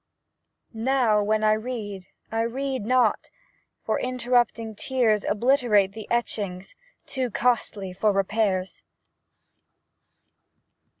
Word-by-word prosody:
Now, 230 -2 +2
when 215 +1 +1
I 215 - +4
read, 215 -4 -5 0.2
I 225 0 0
read 260 0 -2
not, 250 -3 +2 0.6
For - - 0
interrupting 245 -3 0
tears 220 -2 +1
Obliterate 220 -4 +2
the 215 0 -9
etchings 200 -6 -2 0.3
Too 260 -2 -2
costly 215 -5 -1
for 210 +3 +2
repairs. 195 -1 0
220 Hz, 95 wpm, -25 LUFS, 205-250 Hz, 0.6 s, I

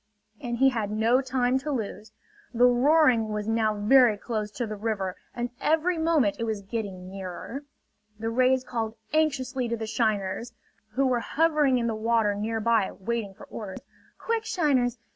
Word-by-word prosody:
And 240 -1 -3
he 270 +2 +5
had 225 -5 -2
no 225 +4 +2
time 260 -1 +1
to 290 +3 -6
lose. 215 -3 -4 0.4
The 245 +2 +5
roaring 250 -2 +4
was 210 0 -3
now 220 -1 +1
very 225 +1 +5
close 215 -1 -3
to 240 - -2
the 215 -1 -5
river 200 -3 -2 0.2
and 240 0 -3
every 320 +3 +2
moment 315 -11 +2
it - - -1
was 220 -3 -3
getting 195 -3 -5
nearer. 195 +8 -7 0.5
The 225 +1 -3
rays 255 +2 +3
called 230 -3 -3 0.2
anxiously 265 -5 0
to 235 0 -2
the 220 - -4
shiners, 220 0 -1 0.4
who 275 +3 +2
were 250 -2 +2
hovering 300 -1 +2
in 235 - -1
the 230 - 0
water 220 -1 +1
nearby 220 0 +1
waiting 210 -1 -3
for - - -13
orders: 200 -4 -7 0.4
"Quick, 460 -1 -1
shiners! 275 - +1
235 Hz, 165 wpm, -26 LUFS, 215-260 Hz, 0.5 s, he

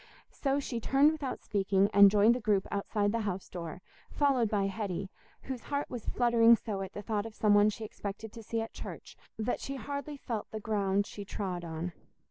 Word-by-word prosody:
So 275 0 0
she 250 -4 -3
turned 275 +6 +4
without 300 -4 -4
speaking, 195 -1 +2
and 200 0 +9
joined 210 +3 +5
the 250 - -2
group 210 -4 +1
outside 205 +1 0
the 230 - 0
house 195 -4 -3
door, 175 0 -7 0.3
followed 265 -6 +2
by 205 -2 +1
Hetty, 195 -2 -3 0.3
whose 260 -3 -5
heart 285 0 -2
was 240 -4 -6
fluttering 235 -1 +5
so 210 -3 -4
at 190 - -6
the 205 - -6
thought 210 +1 -1
of 220 - -12
some 210 -1 +3
one 205 +1 +6
she 220 +1 -5
expected 210 +1 -7
to 230 - -8
see 225 +1 -2
at 225 - -6
church - - -8 0.2
that 220 +3 -1
she 275 - -5
hardly 285 +2 -5
felt 230 -5 -4
the 220 - -5
ground 200 -2 +1
she 205 - -8
trod 190 -3 -4
on. 165 +1 -4
215 Hz, 205 wpm, -31 LUFS, 200-235 Hz, 0.3 s, and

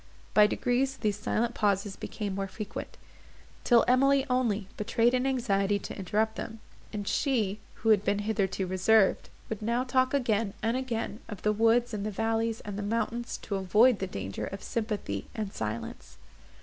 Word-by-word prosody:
By 210 -1 +7
degrees 255 +4 0
these 210 -2 0
silent 230 +3 0
pauses 200 -2 0
became 205 0 -5
more 195 0 -2
frequent; 205 +2 -7 0.7
till 240 -2 +5
Emily, 275 +2 +4
only, 225 -6 +1
betrayed 230 +3 +2
an 255 +1 +1
anxiety 205 -6 +1
to - - -7
interrupt 210 +3 -1
them; 225 -1 -6 0.3
and 205 -2 -5
she; 220 -8 +1 0.2
who 225 - -1
had 210 -3 +5
been 205 - +1
hitherto 195 -3 0
reserved, 185 +3 +3 0.2
would 220 -2 -5
now 235 +3 +1
talk 260 +1 +2
again, 225 -6 0
and 225 +2 +1
again, 235 -4 -3
of 210 -4 -8
the 210 - +3
woods 230 +2 +3
and 205 -1 -3
the 215 - -1
valleys 225 +2 -1
and 205 -1 -6
the - - -2
mountains, 230 +3 -2
to 200 - -2
avoid 210 +5 +4
the 190 - -2
danger 95 - -5
of 195 - -7
sympathy 210 - -3
and 210 -3 -4
silence. 110 +1 -5
215 Hz, 170 wpm, -29 LUFS, 200-235 Hz, 0.7 s, By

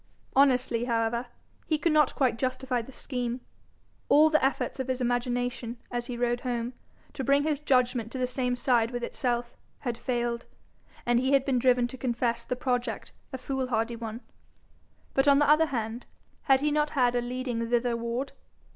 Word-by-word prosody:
Honestly, 255 -3 +3
however, 235 0 0 0.4
he 310 - +2
could 315 +2 +1
not 300 -3 +3
quite 255 -4 +1
justify 255 -1 -1
the 230 - -11
scheme. 250 -2 -3 0.7
All 310 +2 +6
the 310 - +3
efforts 270 0 0
of 260 - -2
his 260 -1 -1
imagination, 245 -1 -1
as 240 0 -2
he 245 - -4
rode 240 0 +1
home, 240 -1 -3 0.4
to 265 - -4
bring 280 +2 +3
his 300 -2 0
judgment 250 -5 +1
to - - -5
the 255 - +1
same 250 0 -1
side 240 -2 +2
with 245 -1 -4
itself, 240 -1 -2 0.3
had 240 -3 -3
failed, 240 -1 -2 0.6
and 240 0 +3
he 265 +2 +1
had 275 -1 +4
been 260 -3 +2
driven 245 -1 +4
to 255 +1 -10
confess 235 -1 -1
the 250 - -2
project 245 -1 -2 0.2
a 260 - -4
foolhardy 250 -4 -1
one. 230 0 -6 0.9
But, 270 +1 +2
on 280 -1 +7
the 290 - +4
other 305 +2 +5
hand, 235 -3 -4 0.4
had 265 0 +6
he 300 0 +1
not 300 0 +2
had 245 -2 +4
a 245 - +2
leading 245 -1 -3
thitherward? 240 +2 0
250 Hz, 175 wpm, -28 LUFS, 240-265 Hz, 0.9 s, on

